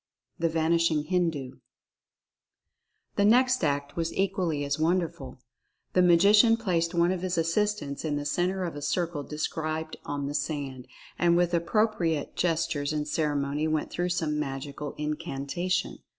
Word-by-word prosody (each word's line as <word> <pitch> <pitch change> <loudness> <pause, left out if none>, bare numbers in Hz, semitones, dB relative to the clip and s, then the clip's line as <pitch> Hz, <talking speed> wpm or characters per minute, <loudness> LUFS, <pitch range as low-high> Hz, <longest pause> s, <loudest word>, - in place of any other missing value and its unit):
THE 165 0 +2
VANISHING 160 -1 +2
HINDU. 160 -6 -1 1.6
The 200 - +4
next 255 +1 +4
act 145 -1 -1
was 165 -1 -1
equally 185 -7 0
as 140 +1 -2
wonderful. 165 -5 -1 0.6
The 180 - +4
Ma 180 -1 +6
gician 210 +5 +6
placed 175 -6 0
one 170 +1 +3
of 185 -2 -2
his 185 -1 -2
assistants 165 -3 0
in 155 -2 -1
the 145 0 -3
center 180 +5 0
of 170 -4 -4
a 145 - -6
circle 165 +1 -1
described 155 +2 -3
on 145 -1 -3
the 140 - -3
sand, 140 -3 -3 0.3
and 170 0 +4
with 175 0 +2
appropriate 170 -3 0
gestures 160 -4 0
and 150 -1 -2
ceremony 150 -1 0
went 155 -1 -1
through 175 +1 -1
some 155 -4 -1
magical 140 +1 -5
incantation. 155 +4 -2
165 Hz, 145 wpm, -28 LUFS, 145-180 Hz, 1.6 s, Ma